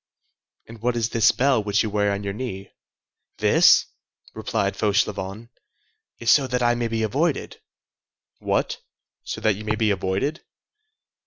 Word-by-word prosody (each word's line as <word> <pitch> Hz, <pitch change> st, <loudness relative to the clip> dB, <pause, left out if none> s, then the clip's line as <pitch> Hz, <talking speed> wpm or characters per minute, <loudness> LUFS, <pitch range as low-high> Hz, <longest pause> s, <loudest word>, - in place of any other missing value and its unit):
"And 115 Hz, -1 st, -12 dB
what 120 Hz, +1 st, 0 dB
is 115 Hz, -1 st, 0 dB
this 115 Hz, -2 st, +4 dB
bell 130 Hz, -4 st, +2 dB
which 100 Hz, +3 st, +1 dB
you 110 Hz, -, -2 dB
wear 105 Hz, 0 st, +1 dB
on 100 Hz, 0 st, -3 dB
your 100 Hz, -1 st, -3 dB
knee?" 100 Hz, -4 st, -6 dB, 0.7 s
"This," -, -, +5 dB, 0.5 s
replied -, -, -2 dB
Fauchelevent, 100 Hz, +5 st, -1 dB, 0.7 s
"is 115 Hz, -, +2 dB
so 140 Hz, -3 st, +4 dB
that 125 Hz, 0 st, -1 dB
I 120 Hz, 0 st, +3 dB
may 120 Hz, -1 st, -1 dB
be 115 Hz, -1 st, -2 dB
avoided." 140 Hz, +8 st, -1 dB, 0.8 s
"What! -, -, -1 dB, 0.4 s
so -, -, -6 dB
that 110 Hz, -, +3 dB
you 105 Hz, -, -8 dB
may 110 Hz, 0 st, -1 dB
be 110 Hz, -1 st, +1 dB
avoided?" 100 Hz, -, -2 dB
110 Hz, 150 wpm, -23 LUFS, 100-120 Hz, 0.8 s, This